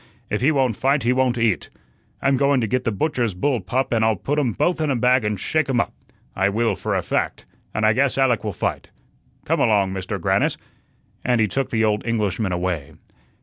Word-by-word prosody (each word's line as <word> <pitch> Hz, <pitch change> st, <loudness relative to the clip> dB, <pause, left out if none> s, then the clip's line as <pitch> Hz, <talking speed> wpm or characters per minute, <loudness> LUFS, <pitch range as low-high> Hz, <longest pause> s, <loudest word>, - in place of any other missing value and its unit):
If 105 Hz, -, -1 dB
he 140 Hz, +5 st, +4 dB
won't 130 Hz, -6 st, +1 dB
fight 135 Hz, +4 st, +1 dB
he 120 Hz, +2 st, +3 dB
won't 130 Hz, -1 st, +1 dB
eat. 115 Hz, -5 st, 0 dB, 0.5 s
I'm 135 Hz, 0 st, +3 dB
going 140 Hz, 0 st, +3 dB
to -, -, +1 dB
get 125 Hz, +3 st, -1 dB
the 115 Hz, -, +1 dB
butcher's 115 Hz, -, -1 dB
bull 125 Hz, +6 st, 0 dB
pup 130 Hz, 0 st, -1 dB
and 110 Hz, -1 st, +2 dB
I'll 110 Hz, 0 st, +3 dB
put 145 Hz, +10 st, -1 dB
um 125 Hz, -6 st, 0 dB
both 175 Hz, -, 0 dB
in 155 Hz, -, 0 dB
a 135 Hz, -, +1 dB
bag 125 Hz, +1 st, +3 dB
and 105 Hz, -2 st, -1 dB
shake 155 Hz, +6 st, 0 dB
um 125 Hz, -3 st, +2 dB
up. -, -, -1 dB, 0.4 s
I 95 Hz, +1 st, +2 dB
will, 115 Hz, +3 st, 0 dB
for -, -, -2 dB
a -, -, 0 dB
fact, -, -, -2 dB, 0.3 s
and 110 Hz, -, 0 dB
I 110 Hz, -, +5 dB
guess 135 Hz, +3 st, +1 dB
Alec 125 Hz, -5 st, +2 dB
will 105 Hz, -, -2 dB
fight. 85 Hz, -, -3 dB, 0.6 s
Come -, -, +1 dB
along, 100 Hz, -3 st, +2 dB
Mister 95 Hz, +2 st, -4 dB
Grannis," 85 Hz, -, +1 dB, 0.7 s
and 125 Hz, -2 st, +2 dB
he 105 Hz, -, +3 dB
took 135 Hz, +7 st, -2 dB
the 110 Hz, -1 st, +1 dB
old 105 Hz, -1 st, 0 dB
Englishman 105 Hz, -3 st, -1 dB
away. 90 Hz, -5 st, -2 dB
115 Hz, 220 wpm, -22 LUFS, 105-130 Hz, 0.7 s, I